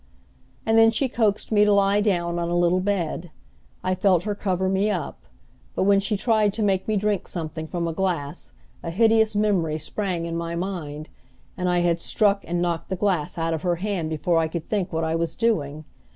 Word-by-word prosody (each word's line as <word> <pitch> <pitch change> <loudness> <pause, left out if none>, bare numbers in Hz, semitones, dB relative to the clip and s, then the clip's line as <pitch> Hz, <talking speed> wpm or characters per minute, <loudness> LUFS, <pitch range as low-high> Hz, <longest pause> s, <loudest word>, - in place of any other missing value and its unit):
And 225 0 +4
then 225 0 +7
she 235 +4 0
coaxed 220 -4 0
me 210 -1 +5
to 210 - +4
lie 200 0 +3
down 175 -4 0
on 170 0 -2
a 175 - 0
little 175 +1 +3
bed. 180 -3 -2 0.5
I 185 - +1
felt 185 -2 +2
her 210 - -1
cover 190 -2 -1
me 195 +2 +1
up; 170 - -4 0.5
but - - +1
when 200 0 +4
she 200 +1 -1
tried 215 -2 +2
to 220 - -1
make 195 -2 +1
me 215 -1 +1
drink 205 -1 -1
something 160 -2 -5
from 170 0 -2
a 165 - -2
glass 170 -4 -3 0.3
a 170 - -5
hideous 220 +3 +3
memory 190 -7 +1
sprang 175 +2 -3
in 165 0 -4
my 170 0 -3
mind, 165 -5 -5 0.5
and 180 0 -1
I 175 0 +2
had 170 -1 +1
struck 200 +2 +2
and 175 +1 -1
knocked 170 -2 -2
the 190 - -1
glass 180 -6 -1
out 165 0 0
of 160 - -3
her 175 0 +1
hand 180 -3 -2
before 165 +2 +1
I 160 - +1
could 160 0 -5
think 200 -4 -1
what 160 0 -1
I 160 0 0
was 165 -1 -1
doing. 155 -10 -1
180 Hz, 210 wpm, -24 LUFS, 165-205 Hz, 0.5 s, then